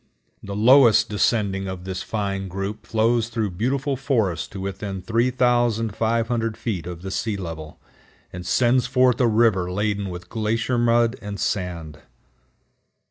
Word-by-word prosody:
The 100 Hz, 0 st, -6 dB
lowest 120 Hz, +1 st, +6 dB
descending 100 Hz, -2 st, 0 dB
of 95 Hz, -1 st, -6 dB
this 95 Hz, 0 st, -4 dB
fine 100 Hz, -3 st, -3 dB
group 100 Hz, +3 st, -5 dB
flows 115 Hz, +1 st, +1 dB
through 110 Hz, -4 st, -2 dB
beautiful 130 Hz, +9 st, -1 dB
forests 115 Hz, -, 0 dB
to 100 Hz, -, -9 dB
within 95 Hz, 0 st, -5 dB
3500 115 Hz, -1 st, +1 dB
feet 95 Hz, -8 st, -4 dB
of 90 Hz, -1 st, -7 dB
the 95 Hz, -, -5 dB
sea 105 Hz, +2 st, -2 dB
level, 80 Hz, -4 st, -7 dB, 0.5 s
and 90 Hz, 0 st, -6 dB
sends 125 Hz, +7 st, +2 dB
forth 125 Hz, -1 st, +3 dB
a 120 Hz, -, +4 dB
river 110 Hz, -5 st, +2 dB
laden 100 Hz, 0 st, -1 dB
with 90 Hz, 0 st, -8 dB
glacier 115 Hz, +4 st, -1 dB
mud 120 Hz, +1 st, +2 dB
and 100 Hz, -1 st, -6 dB
sand. 85 Hz, -6 st, -3 dB
110 Hz, 135 wpm, -23 LUFS, 95-120 Hz, 0.5 s, lowest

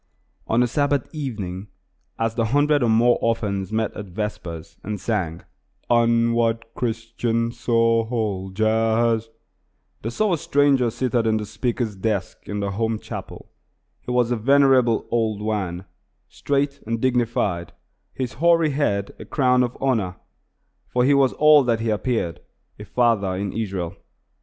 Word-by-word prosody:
On 120 Hz, +2 st, +3 dB
a -, -, +1 dB
Sabbath 145 Hz, +1 st, 0 dB
evening, 105 Hz, -, -5 dB, 0.5 s
as 115 Hz, 0 st, 0 dB
the 115 Hz, -1 st, 0 dB
hundred 145 Hz, +4 st, +2 dB
or 120 Hz, -, +2 dB
more 120 Hz, +2 st, +4 dB
orphans 105 Hz, -5 st, -1 dB
met 110 Hz, -1 st, -1 dB
at 105 Hz, -, -7 dB
vespers 85 Hz, -4 st, -6 dB
and 105 Hz, 0 st, -4 dB
sang, 90 Hz, -8 st, -2 dB, 0.5 s
"Onward, 115 Hz, -1 st, +2 dB
Christian 115 Hz, 0 st, -2 dB
Soldiers!" 115 Hz, -1 st, +1 dB, 0.7 s
they 115 Hz, -, -3 dB
saw 205 Hz, -, +1 dB
a 165 Hz, -, 0 dB
stranger 145 Hz, -6 st, +3 dB
seated 120 Hz, -1 st, 0 dB
at 110 Hz, 0 st, +2 dB
the 105 Hz, -, -3 dB
speaker's 120 Hz, -1 st, -2 dB
desk 100 Hz, 0 st, -2 dB
in 105 Hz, 0 st, -2 dB
the 100 Hz, 0 st, -2 dB
home 110 Hz, +2 st, -1 dB
chapel. -, -, -9 dB, 0.5 s
He -, -, -10 dB
was 125 Hz, -1 st, +2 dB
a -, -, +2 dB
venerable 130 Hz, -1 st, +4 dB
old 110 Hz, -3 st, 0 dB
Wan, 100 Hz, -4 st, -3 dB, 0.4 s
straight 140 Hz, 0 st, -1 dB
and 115 Hz, 0 st, -1 dB
dignified, 115 Hz, -9 st, 0 dB, 0.4 s
his 130 Hz, -2 st, -4 dB
hoary 165 Hz, -2 st, +4 dB
head 100 Hz, -9 st, -1 dB
a -, -, -8 dB
crown 125 Hz, -2 st, +2 dB
of 125 Hz, -1 st, -1 dB
honor; 110 Hz, -9 st, 0 dB, 0.7 s
for 125 Hz, 0 st, +1 dB
he 145 Hz, -, +4 dB
was 135 Hz, -2 st, +3 dB
all 150 Hz, -1 st, +6 dB
that 115 Hz, -2 st, +1 dB
he 115 Hz, -1 st, -1 dB
appeared 105 Hz, -5 st, -1 dB, 0.4 s
a 105 Hz, -, -8 dB
father 105 Hz, -3 st, +1 dB
in 100 Hz, +1 st, -3 dB
Israel. 95 Hz, -6 st, -3 dB
115 Hz, 140 wpm, -23 LUFS, 105-125 Hz, 0.7 s, all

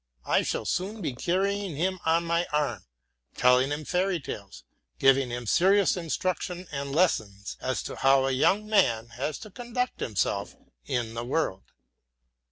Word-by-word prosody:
I -, -, +3 dB
shall -, -, -2 dB
soon 195 Hz, +5 st, -2 dB
be 140 Hz, -, -3 dB
carrying 190 Hz, +5 st, -1 dB
him 185 Hz, +5 st, -1 dB
on 165 Hz, +1 st, +3 dB
my 170 Hz, +1 st, +1 dB
arm, 140 Hz, -, -1 dB, 0.5 s
telling 125 Hz, +2 st, +4 dB
him 150 Hz, +1 st, -3 dB
fairy 180 Hz, +1 st, 0 dB
tales, 100 Hz, -8 st, -8 dB, 0.3 s
giving 135 Hz, -1 st, +4 dB
him 120 Hz, 0 st, -4 dB
serious 190 Hz, -, +4 dB
instruction 180 Hz, +1 st, -2 dB
and 140 Hz, -1 st, -4 dB
lessons 110 Hz, -, 0 dB
as 130 Hz, 0 st, -2 dB
to -, -, -6 dB
how 135 Hz, 0 st, +4 dB
a 135 Hz, -, +1 dB
young 195 Hz, +11 st, +2 dB
man 120 Hz, -, +2 dB
has 130 Hz, +6 st, -3 dB
to 215 Hz, -, -12 dB
conduct 245 Hz, +4 st, -3 dB
himself 100 Hz, -1 st, -1 dB, 0.3 s
in 120 Hz, -3 st, -2 dB
the 115 Hz, 0 st, -4 dB
world. 120 Hz, -7 st, -1 dB
150 Hz, 155 wpm, -27 LUFS, 125-185 Hz, 0.5 s, telling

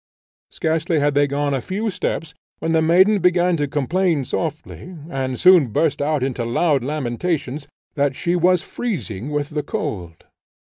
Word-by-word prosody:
Scarcely 160 Hz, +1 st, -1 dB
had 145 Hz, 0 st, +1 dB
they 145 Hz, 0 st, +3 dB
gone 145 Hz, 0 st, -1 dB
a 135 Hz, -, -1 dB
few 205 Hz, -, -3 dB
steps, 165 Hz, -3 st, -3 dB, 0.2 s
when 165 Hz, -, -2 dB
the 160 Hz, -1 st, +3 dB
maiden 190 Hz, +6 st, +4 dB
began 180 Hz, 0 st, +3 dB
to 145 Hz, -1 st, -1 dB
complain 150 Hz, +2 st, 0 dB
softly, 165 Hz, +4 st, -5 dB
and 130 Hz, -3 st, -3 dB
soon 180 Hz, -6 st, +6 dB
burst 145 Hz, +6 st, 0 dB
out 145 Hz, -2 st, 0 dB
into 130 Hz, -2 st, -2 dB
loud 135 Hz, +3 st, +1 dB
lamentations, 145 Hz, +1 st, -3 dB, 0.3 s
that 140 Hz, -2 st, 0 dB
she 175 Hz, +5 st, -1 dB
was 180 Hz, 0 st, +3 dB
freezing 145 Hz, -, -4 dB
with 145 Hz, -1 st, -2 dB
the 150 Hz, 0 st, -1 dB
cold. 95 Hz, -, -5 dB
150 Hz, 155 wpm, -21 LUFS, 140-175 Hz, 0.3 s, soon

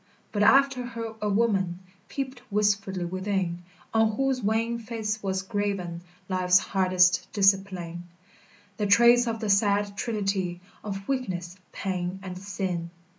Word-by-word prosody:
But 205 Hz, -, -1 dB
after 270 Hz, +3 st, +5 dB
her 230 Hz, -2 st, -5 dB
a 210 Hz, -, 0 dB
woman 195 Hz, -5 st, +1 dB, 0.3 s
Peeped 265 Hz, -2 st, -4 dB
wistfully 200 Hz, -3 st, +1 dB
within, 185 Hz, -1 st, -2 dB, 0.3 s
On 220 Hz, -1 st, +3 dB
whose 265 Hz, +2 st, 0 dB
wan 225 Hz, +2 st, 0 dB
face 215 Hz, -2 st, -3 dB
was 190 Hz, -1 st, -2 dB
graven 195 Hz, -5 st, -2 dB, 0.3 s
Life's 185 Hz, -1 st, +4 dB
hardest 185 Hz, -2 st, +2 dB
discipline, 190 Hz, -4 st, +1 dB, 0.7 s
The 210 Hz, -2 st, 0 dB
trace 235 Hz, +4 st, +6 dB
of 225 Hz, -1 st, -2 dB
the 215 Hz, -, -2 dB
sad 200 Hz, 0 st, +2 dB
trinity 195 Hz, -5 st, -2 dB, 0.2 s
Of 195 Hz, -2 st, -5 dB
weakness, 185 Hz, -10 st, -3 dB, 0.2 s
pain, 185 Hz, -1 st, -3 dB
and 185 Hz, -1 st, -6 dB
sin. 180 Hz, -3 st, -3 dB
200 Hz, 125 wpm, -27 LUFS, 185-225 Hz, 0.7 s, trace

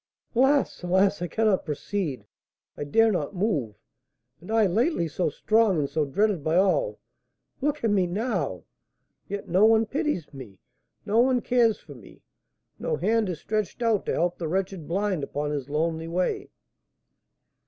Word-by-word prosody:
"Alas! 270 Hz, +3 st, +2 dB
alas! 190 Hz, +2 st, +2 dB
I 175 Hz, -, -1 dB
cannot 215 Hz, -1 st, +1 dB
proceed, 150 Hz, -, -3 dB, 0.5 s
I 145 Hz, -, -5 dB
dare 225 Hz, +10 st, +4 dB
not 180 Hz, -1 st, -2 dB
move! 160 Hz, -, -1 dB, 0.6 s
And 175 Hz, -, -14 dB
I, 225 Hz, -1 st, +4 dB
lately 205 Hz, -, +1 dB
so 160 Hz, +2 st, -1 dB
strong 215 Hz, +3 st, +2 dB
and 145 Hz, -2 st, 0 dB
so 155 Hz, +1 st, -1 dB
dreaded 195 Hz, +3 st, 0 dB
by 160 Hz, +2 st, 0 dB
all, 340 Hz, -, +2 dB, 0.6 s
look 295 Hz, 0 st, -1 dB
at 225 Hz, -, +2 dB
me 190 Hz, -3 st, +2 dB
now! 175 Hz, -, -2 dB, 0.7 s
Yet 200 Hz, 0 st, -5 dB
no 185 Hz, +4 st, +3 dB
one 225 Hz, 0 st, +5 dB
pities 285 Hz, -, -2 dB
me, 120 Hz, -8 st, -10 dB, 0.5 s
no 215 Hz, +3 st, +2 dB
one 255 Hz, +1 st, +4 dB
cares 235 Hz, -2 st, +2 dB
for -, -, -13 dB
me, -, -, -16 dB, 0.6 s
no 485 Hz, -, -1 dB
hand 225 Hz, -, +1 dB
is 170 Hz, -3 st, -4 dB
stretched 215 Hz, +2 st, -2 dB
out 225 Hz, -4 st, +1 dB
to -, -, 0 dB
help 175 Hz, +1 st, 0 dB
the 165 Hz, -, -2 dB
wretched 185 Hz, -1 st, -2 dB
blind 190 Hz, -2 st, -1 dB
upon 145 Hz, +1 st, -3 dB
his 145 Hz, -2 st, -4 dB
lonely 160 Hz, +2 st, -1 dB
way!" 185 Hz, -, -1 dB
190 Hz, 160 wpm, -26 LUFS, 160-225 Hz, 0.7 s, one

